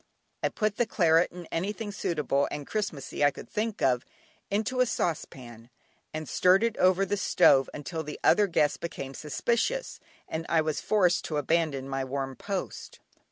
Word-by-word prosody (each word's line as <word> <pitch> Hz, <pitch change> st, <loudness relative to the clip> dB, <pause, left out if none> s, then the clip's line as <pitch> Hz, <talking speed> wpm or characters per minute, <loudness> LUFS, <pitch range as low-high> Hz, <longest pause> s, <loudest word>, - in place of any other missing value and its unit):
I -, -, +1 dB
put 215 Hz, -1 st, -1 dB
the 240 Hz, -, +1 dB
claret, 170 Hz, -5 st, +3 dB
and 175 Hz, -1 st, -10 dB
anything 205 Hz, +5 st, -3 dB
suitable 150 Hz, -8 st, 0 dB
and 145 Hz, -1 st, -5 dB
"Christmassy," 160 Hz, -9 st, -3 dB
I 145 Hz, -, +7 dB
could -, -, -10 dB
think 220 Hz, 0 st, -3 dB
of, 125 Hz, -2 st, +3 dB, 0.5 s
into 220 Hz, +5 st, -1 dB
a 255 Hz, -, +4 dB
saucepan, 125 Hz, -, -4 dB, 0.4 s
and 155 Hz, -1 st, -5 dB
stirred 185 Hz, -, +4 dB
it 230 Hz, -1 st, +1 dB
over 185 Hz, +1 st, +4 dB
the 205 Hz, +2 st, -1 dB
stove 135 Hz, -7 st, +4 dB
until 160 Hz, +3 st, -5 dB
the 150 Hz, -1 st, -7 dB
other 205 Hz, -1 st, +5 dB
guests 150 Hz, -4 st, +2 dB
became 135 Hz, -5 st, -6 dB
suspicious, 235 Hz, -, -1 dB, 0.3 s
and 160 Hz, +1 st, -4 dB
I 165 Hz, -, +3 dB
was 155 Hz, -1 st, -1 dB
forced 185 Hz, -5 st, +2 dB
to 155 Hz, -, -2 dB
abandon 145 Hz, -2 st, 0 dB
my 135 Hz, 0 st, -2 dB
warm 135 Hz, 0 st, -4 dB
post. 195 Hz, +3 st, -5 dB
165 Hz, 165 wpm, -28 LUFS, 140-205 Hz, 0.5 s, I